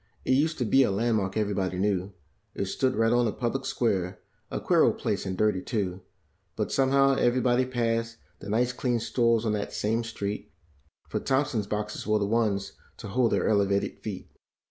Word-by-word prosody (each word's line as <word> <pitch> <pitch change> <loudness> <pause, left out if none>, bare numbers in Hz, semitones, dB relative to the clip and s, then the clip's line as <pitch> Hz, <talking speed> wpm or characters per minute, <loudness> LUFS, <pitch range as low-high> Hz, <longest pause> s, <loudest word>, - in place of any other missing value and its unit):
It - - +1
used 155 +5 +2
to 125 - -1
be 135 +5 +4
a 130 - +3
landmark 100 -2 0
every¬ 105 -2 0
body 95 -2 -1
knew, 95 0 0 0.5
stood 130 +7 0
right 115 +1 +3
on 120 0 +3
the 110 - +1
public 125 +4 -2
square, 95 -6 -1 0.3
a - - -3
queer - - +3
old - - +3
place - - -2
and 95 0 -3
dirty, 105 -3 +2
too; 95 -6 -3 0.5
But, 105 - -2
somehow, 135 0 +4
every¬ 120 0 +2
body 125 0 +2
passed 115 -2 -1 0.2
the 100 - -8
nice 120 +4 +1
clean 125 -2 0
stores 115 0 +1
on 110 - +1
that 105 -1 -3
same 115 +3 0
street, 105 -7 -5 0.6
For - - -2
Thompson's 130 -6 0
boxes 105 0 -4
were 110 0 +3
the 100 - 0
ones 105 -2 0 0.2
to - - -8
hold 115 +3 +2
their - - +1
elevated 100 -2 +1
feet. 105 -4 -7
110 Hz, 190 wpm, -27 LUFS, 100-120 Hz, 0.6 s, be